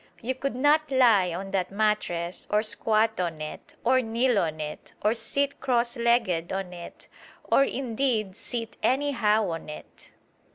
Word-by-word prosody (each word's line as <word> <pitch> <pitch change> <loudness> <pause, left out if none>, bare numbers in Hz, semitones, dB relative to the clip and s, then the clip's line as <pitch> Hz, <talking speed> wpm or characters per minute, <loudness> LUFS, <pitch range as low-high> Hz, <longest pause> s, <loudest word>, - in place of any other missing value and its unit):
You 255 +3 -2
could 265 0 -3
not 295 +3 +3
lie 230 -9 +4
on 190 +3 -5
that 190 -2 0
mattress, 195 -4 -1
or 210 +1 +2
squat 220 0 +1
on 170 -3 -2
it, 155 0 -8
or 255 +2 +4
kneel 235 0 +1
on 155 -3 -2
it, 150 0 -7
or 210 - +3
sit 280 +5 -2
cross 240 -1 +1
legged 235 -8 +1
on 190 -2 -3
it, 170 -1 -10 0.4
or 275 - +4
indeed 240 -6 -1
sit 230 0 -5
anyhow 235 -7 +2
on 165 -1 -6
it. 150 - -11
220 Hz, 155 wpm, -26 LUFS, 185-255 Hz, 0.4 s, lie